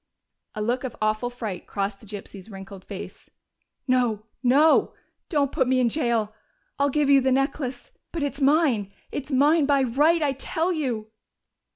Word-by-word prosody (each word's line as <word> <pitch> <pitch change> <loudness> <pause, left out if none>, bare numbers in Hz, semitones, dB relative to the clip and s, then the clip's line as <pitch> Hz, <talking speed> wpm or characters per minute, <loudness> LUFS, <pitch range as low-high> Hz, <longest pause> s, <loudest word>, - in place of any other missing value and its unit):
A 210 - -2
look 245 +4 -1
of 255 -3 -5
awful 215 +3 0
fright 220 -7 -6
crossed 200 0 -3
the 220 - -16
gypsy's 200 0 -9
wrinkled 195 -1 -10
face. - - -9 0.6
"No! 240 -5 +1 0.2
No! 280 +5 +4 0.3
Don't 285 -5 +1
put 260 - +1
me 260 0 +3
in 245 -2 +3
jail! 230 -6 0 0.5
I'll 280 0 +3
give 295 +1 +1
you 275 -1 +6
the 260 0 +1
necklace. 270 -1 -1 0.2
But 330 -3 -3
it's 285 0 -3
mine 270 -8 +3 0.2
it's 285 +1 -5
mine 290 +3 +4
by 280 -2 +3
right, 300 +7 +3
I 285 - +2
tell 325 +6 -1
you!" 240 -9 -3
255 Hz, 165 wpm, -25 LUFS, 215-285 Hz, 0.6 s, you